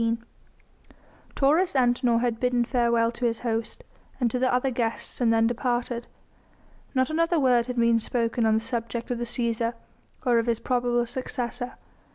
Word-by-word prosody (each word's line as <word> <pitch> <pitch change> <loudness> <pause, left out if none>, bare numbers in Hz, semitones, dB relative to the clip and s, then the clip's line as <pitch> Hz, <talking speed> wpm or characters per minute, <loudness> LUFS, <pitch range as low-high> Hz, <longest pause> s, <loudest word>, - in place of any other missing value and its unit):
Taurus 310 +5 +2
Antinor 245 -2 +2
had 235 -2 -1
bidden 250 -1 +1
farewell 235 -2 +2
to 240 +1 -4
his 230 -1 -2
host, 225 -2 -3 0.4
and 240 -3 +1
to 250 - -1
the 255 0 +2
other 250 +2 +1
guests 235 0 -2
and 235 -2 +3
then 225 0 +3
departed. 240 0 -1 0.9
Not 260 +2 +2
another 330 +1 +2
word 250 -3 +3
had 250 - -4
been 235 -1 +3
spoken 230 +1 -1
on 220 - +3
the - - +3
subject 235 0 -4
of 240 - -2
the 240 - -2
Cæsar 235 -1 0 0.5
or 240 -2 +4
of 230 - -2
his 230 -1 +2
probable 240 -1 0
successor. 245 0 -3
240 Hz, 165 wpm, -26 LUFS, 230-250 Hz, 0.9 s, or